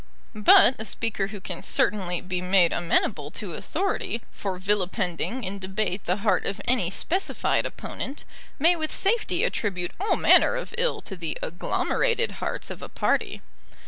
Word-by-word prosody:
But 215 +3 +7
a - - -3
speaker 210 -1 -2
who 205 0 -8
can 180 -2 -6
certainly 180 -4 0
be 180 -1 -3
made 180 -2 +4
amenable 165 -3 0
to 195 -6 -4
authority 315 - -2
for 195 -2 -4
vilipending 195 +4 -1
in 195 +1 -3
debate 190 0 -3
the 180 - +1
heart 210 - +3
of 195 - -3
any 240 -8 +2
specified 360 - 0
opponent, 275 +3 -6 0.3
may 335 +5 +4
with 315 -2 -3
safety 440 +4 +1
attribute 185 -5 -1
all 405 +3 +1
manner - - +5
of - - -5
ill 485 +1 +1
to 195 - -6
the 165 -4 -3
agglomerated 465 - 0
hearts - - -3
of - - -8
a - - -7
party. - - -1
200 Hz, 155 wpm, -25 LUFS, 180-260 Hz, 0.3 s, But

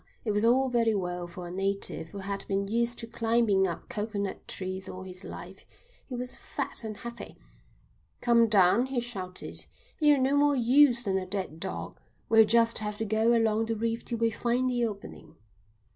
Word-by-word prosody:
It 215 - +1
was 210 +1 +1
all 255 +3 +4
very 230 -3 +2
well 180 -2 -3
for 175 +1 -9
a - - -7
native 195 -3 -2
who 200 - -9
had 200 0 -4
been 200 0 -1
used 235 +3 +1
to 230 - -5
climbing 225 -4 +2
up 170 - -6
coconut 205 -2 -4
trees 190 0 -4
all 185 - -7
his 185 0 -8
life. - - -9 0.4
He 255 - -6
was 250 +1 -2
fat - - -4
and 215 -2 -5
heavy. 235 +2 -8 0.8
"Come 235 -1 +4
down," 210 +4 +4
he 265 -2 -1
shouted. 190 -7 -5 0.3
"You're 295 -2 +5
no 265 +1 +2
more 290 0 +4
use 250 0 +5
than 190 -3 0
a 185 - -6
dead 185 -5 -4
dog. - - -6 0.3
We'll 225 -1 +7
just 230 +1 +4
have 210 -1 -4
to 225 - -2
go 220 +3 +2
along 225 0 +1
the 225 - -1
reef 230 +1 -2
till 235 - -3
we 230 0 +1
find 240 +3 0
the 240 -1 +1
opening." 200 -2 -10
225 Hz, 190 wpm, -28 LUFS, 195-235 Hz, 0.8 s, We'll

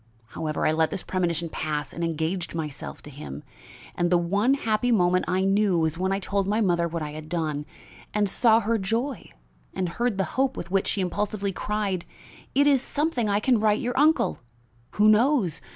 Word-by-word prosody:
However, 155 -2 -3
I - - +4
let 160 0 +2
this 190 - -4
premonition 170 -2 -1
pass 150 -2 -3
and 170 - -4
engaged 165 +2 -2
myself 150 -3 -5
to 150 - -10
him, 100 - -8 0.5
and 175 0 0
the 175 - +4
one 200 +10 +2
happy 230 -2 0
moment 180 -4 +3
I 185 +1 +1
knew 195 -1 +3
was 160 -1 +1
when 185 +3 -1
I 195 - +1
told 200 0 -1
my 210 +2 +1
mother 175 -5 +2
what 165 -1 -4
I 150 - -5
had 155 +1 -9
done, 155 -3 -2 0.4
and 210 -1 +1
saw 225 +3 +4
her 230 +1 0
joy 230 +6 -2 0.5
and 185 - -1
heard 235 +4 -1
the 195 - +2 0.2
hope 270 0 0
with 175 - -6
which 195 0 +1
she 200 - 0
impulsively 200 +2 -2
cried: 200 -2 -2 0.5
'It 285 +1 +5
is 280 -3 +4
something 285 -6 -1
I 200 0 +2
can 245 +1 +2
write 215 0 +2
your 245 0 -2
uncle. 305 +4 +3 0.5
Who 210 +1 +4
knows? 215 - +3
195 Hz, 195 wpm, -25 LUFS, 170-220 Hz, 0.5 s, It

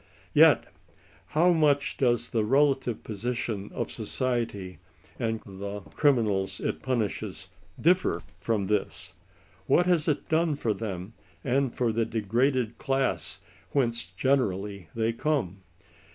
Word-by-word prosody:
Yet - - +6 0.6
how 170 +4 +4
much 145 -3 +2
does 120 -2 +1
the 110 -2 +1
relative 135 0 +2
position 110 -1 -3
of - - -3
society 115 -7 -3 0.4
and 115 -1 -1
the 100 +1 -6
criminals 105 -9 +2
it - - -2
punishes 120 -6 -2 0.3
differ 165 - +2 0.2
from 110 -4 0
this? 95 -2 -2 0.5
What 175 - +4
has 175 -4 +2
it 150 -2 0
done 160 -1 +2
for 115 -6 0
them, 100 -1 -5 0.3
and 135 0 +1
for 120 -1 0
the 115 +1 +1
degraded 120 +3 0
class 135 -2 -1 0.3
whence 115 -9 +1
generally 100 - -1
they 115 0 +1
come 115 - -1
115 Hz, 120 wpm, -27 LUFS, 100-135 Hz, 0.6 s, Yet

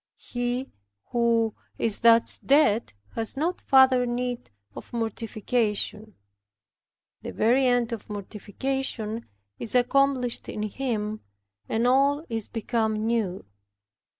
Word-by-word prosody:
He 245 +2 -3 0.4
who 230 -2 +2 0.2
is 220 -3 0
thus 230 0 +4
dead 270 - +3 0.2
has 225 +4 -2
no 330 +5 +1
further 260 -2 +5
need 245 0 -3 0.3
of - - -10
mortification. 220 -1 -2 1.1
The - - -6
very 250 +4 +3
end 245 -1 +1
of 225 - -7
mortification 220 +3 -4 0.3
is 230 - +3
accomplished 250 0 +2
in 210 - -4
him, 215 -2 -3 0.5
and 225 +2 0
all 280 +4 +3
is 225 -2 -2
become 220 -1 -1
new. 220 -5 -1
235 Hz, 105 wpm, -26 LUFS, 220-255 Hz, 1.1 s, further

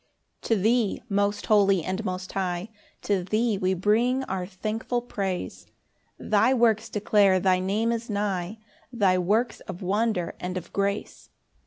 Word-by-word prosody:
1 - - -8
To 225 - +3
thee, 220 +2 +1
most 200 0 0
holy, 200 -4 +4
and 190 +5 -3
most 185 -1 -4
high, 185 +1 -2 0.3
To 195 -3 0
thee, 215 +2 0
we 185 0 +1
bring 230 +8 +2
our 185 -6 -4
thankful 215 +5 -3
praise; 195 -6 -4 0.5
Thy 220 +5 +2
works 225 -2 +2
declare 205 -2 +3
thy 185 0 +2
name 205 +5 0
is 235 0 -3
nigh, 200 -1 -2 0.3
Thy 195 -6 +2
works 220 +6 +1
of 180 - -8
wonder 200 -2 0
and 180 +1 -4
of 180 - -8
grace. 200 +1 -2
200 Hz, 150 wpm, -26 LUFS, 185-225 Hz, 0.5 s, holy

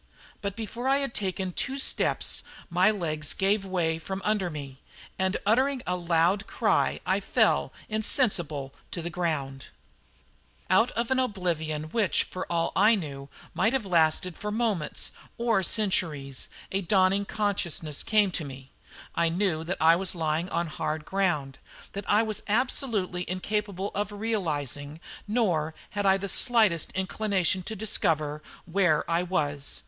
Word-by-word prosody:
But 200 -1 -3
before 230 +3 -4
I 270 +1 +4
had 275 -4 -1
taken 190 -2 -2
two 265 +9 -2
steps 270 - +1 0.3
my 180 +4 +5
legs 155 -7 -1
gave 195 +1 +2
way 170 -4 0
from 190 +4 -5
under 210 -4 +1
me, 140 -4 -7 0.4
and 190 0 +1
uttering 255 +5 +2
a 180 - 0
loud 175 +3 +2
cry - - +1
I - - +2
fell - - +2 0.2
insensible 175 - +1 0.2
to 170 - -4
the 170 - -4
ground. 145 -7 -2 1.0
Out 225 +6 +5
of 235 +2 -2
an 260 - +3
oblivion 170 -10 -1
which, 220 -5 +2
for 185 - -6
all 170 -1 +1
I 215 +4 +6
knew, 140 -7 -6 0.2
might 220 - +2
have 265 -5 0
lasted 170 0 +2
for 210 - -5
moments 210 -7 0 0.3
or 230 -4 +2
centuries, 165 - 0 0.2
a 195 - 0
dawning 195 +1 +3
consciousness 175 -8 -1
came 210 -3 +3
to 170 - -2
me. 135 -1 -10 0.4
I 170 0 +2
knew 170 -2 0
that 185 - -2
I 165 +1 +6
was 185 +1 +2
lying 160 +1 -1
on 170 -1 0
hard 155 -1 -3
ground; 170 -9 -1 0.3
that 200 0 -6
I 210 +2 +5
was 215 -2 -3
absolutely 215 -5 0
incapable 200 +1 -2
of 205 0 -2
realising, 155 - -2 0.3
nor 175 -9 +1 0.2
had 205 -1 0
I 190 0 +5
the 200 +1 -4
slightest 215 -6 +3
inclination 190 -1 0
to 220 +5 -5
discover, 160 -8 0 0.2
where 175 -4 +2
I 170 +1 +2
was. 145 - -2
185 Hz, 150 wpm, -27 LUFS, 160-210 Hz, 1.0 s, I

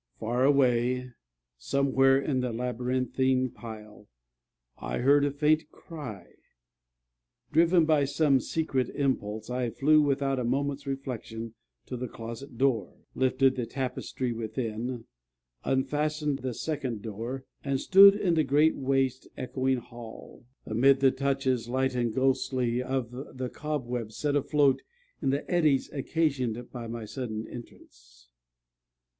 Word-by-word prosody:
Far 120 +3 0
away, 125 -2 +2 0.5
somewhere 135 - +3
in 135 -1 -1
the 125 -1 -1
labyrinthine 125 +2 0
pile, 105 -2 -11 0.7
I - - -3
heard 140 +3 +4
a 145 - +2
faint 150 +2 +1
cry. 125 - -9 1.3
Driven 170 +2 +4
by 155 -3 +3
some 140 -1 +3
secret 135 -4 -1
impulse, 110 -5 -1
I 125 -1 -1
flew, 150 +6 +4
without 140 -2 +1
a - - -1
moment's 140 +3 -1
reflection, 115 -4 -5 0.3
to 125 - -6
the 125 +1 -4
closet 115 +3 -8
door, 120 -7 0 0.2
lifted 130 0 +2
the 125 -3 -3
tapestry 125 -1 -3
within, 115 +1 -4 0.6
unfastened 150 +2 0
the 125 -2 -4
second 135 -9 -3
door, 115 +5 -5 0.2
and 140 -1 0
stood 195 +4 +8
in 200 -4 +1
the 160 -1 +3
great 150 +3 +3
waste 135 -1 0
echoing 130 +1 0
hall, 120 0 -11 0.2
amid 130 +5 +4
the 135 -1 +5
touches, 130 -3 -1
light 130 +1 0
and 120 -2 0
ghostly, 130 -2 +1
of 130 -2 -2 0.3
the 130 -1 -3
cobwebs 125 -7 -4
set 145 -1 0
afloat 140 -1 +3 0.4
in - - +1
the 140 +2 -1
eddies 155 -7 +2
occasioned 130 -5 -1
by 120 -2 -6
my 115 -1 -5
sudden 110 -2 -5
entrance. - - -13
130 Hz, 125 wpm, -28 LUFS, 120-140 Hz, 1.3 s, stood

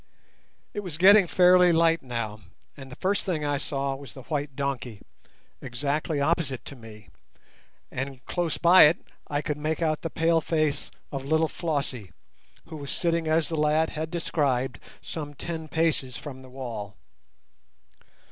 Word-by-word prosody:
It - - -3
was 180 -7 -5
getting 195 +2 +7
fairly 180 0 +6
light 165 0 +3
now, 115 -4 -4 0.4
and 135 -2 -11
the - - -8
first 200 +2 0
thing 160 -6 -2
I 145 -1 +1
saw 140 -2 -1
was 135 0 -9
the 130 - -11
white 145 -2 -3
donkey, 130 -6 -3 0.6
exactly 140 +4 -2
opposite 140 -3 0
to 140 - -8
me, 110 -4 -13 0.8
and 135 -1 -5
close 175 -3 -1
by 175 +1 +8
it 155 +3 +4 0.3
I 145 0 -1
could 150 -2 -2
make 155 +1 -1
out 155 -2 0
the 165 - -3
pale 165 0 +2
face 155 -3 0 0.2
of 135 -2 -4
little 160 +2 +2
Flossie, 140 - -3 0.5
who 160 -1 -8
was 140 -2 -7
sitting 170 -2 0
as 160 0 +2
the 165 - -3
lad 155 +1 +2
had 155 +1 -4
described, 140 -7 -1 0.2
some 145 -3 -6
ten 160 +1 -5
paces 155 -5 0
from 135 -3 -8
the 130 - -13
wall. 115 -6 -6
150 Hz, 155 wpm, -26 LUFS, 135-165 Hz, 0.8 s, by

